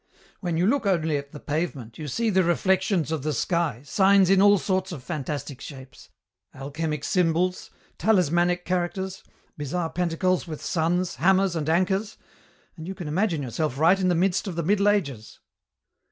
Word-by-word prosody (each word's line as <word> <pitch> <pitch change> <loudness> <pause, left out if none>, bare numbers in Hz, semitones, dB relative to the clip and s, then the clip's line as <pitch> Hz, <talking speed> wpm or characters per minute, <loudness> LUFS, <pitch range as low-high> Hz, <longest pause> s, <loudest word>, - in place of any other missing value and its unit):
When 175 -4 -2
you 175 - +2
look 245 0 +1
only 165 -5 +1
at 140 0 -7
the 150 - -9
pavement 145 -7 -4
you 155 - -5
see 225 - 0
the 190 -1 +3
reflections 175 - +1
of 160 -3 -1
the 155 +2 -2
sky 150 -2 -1
signs 195 +3 +4
in 195 -1 +5
all 205 0 +6
sorts 190 -1 -1
of 145 -7 -7
fantastic 145 -2 -5
shapes; 130 -3 -11 0.5
alchemic 145 +2 -4
symbols, 180 0 0 0.3
talismanic 175 -2 +2
characters, 185 +1 -2 0.4
bizarre 160 +3 -2
pantacles 180 +1 0
with 155 -2 -6
suns, 175 +1 -1
hammers, 190 0 +3
and 155 -1 -2
anchors, 190 +5 0 0.6
and 160 -1 -9
you 190 - -5
can 175 - -7
imagine 165 -1 0
yourself 135 +2 -2
right 170 +6 +4
in 185 - +1
the 180 - +2
midst 185 +4 +1
of 185 - -4
the 170 - -2
Middle 200 +4 +3
Ages." 140 - -2
175 Hz, 170 wpm, -25 LUFS, 155-190 Hz, 0.6 s, all